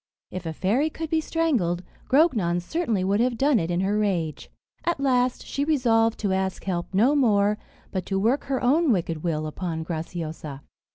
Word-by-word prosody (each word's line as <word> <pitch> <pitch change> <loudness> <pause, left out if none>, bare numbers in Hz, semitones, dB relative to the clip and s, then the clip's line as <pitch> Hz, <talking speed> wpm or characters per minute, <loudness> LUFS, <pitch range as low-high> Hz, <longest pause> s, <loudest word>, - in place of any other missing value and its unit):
If 185 -2 -5
a 160 - -3
fairy 225 - +1
could 320 0 -6
be 320 -1 +2
strangled, 250 - 0 0.3
Grognon 230 - +3
certainly 225 - -1
would 200 +2 +1
have 240 0 +1
done 275 -2 +3
it 165 - -2
in 175 +1 0
her 205 +2 +1
rage. 170 -8 -1 0.3
At 345 -4 0
last, 255 -2 +1
she 280 - -2
resolved 230 -7 +2
to 200 -3 +1
ask 190 0 -2
help 175 -3 -3
no 225 +9 +4
more, 210 -5 +3 0.3
but 185 -2 -3
to 195 - -1
work 230 +8 +1
her 265 -2 -2
own 295 +4 +4
wicked 165 -6 -1
will 155 -3 -1
upon 160 +1 -4
Graciosa. 160 -3 -5
205 Hz, 180 wpm, -25 LUFS, 175-265 Hz, 0.3 s, no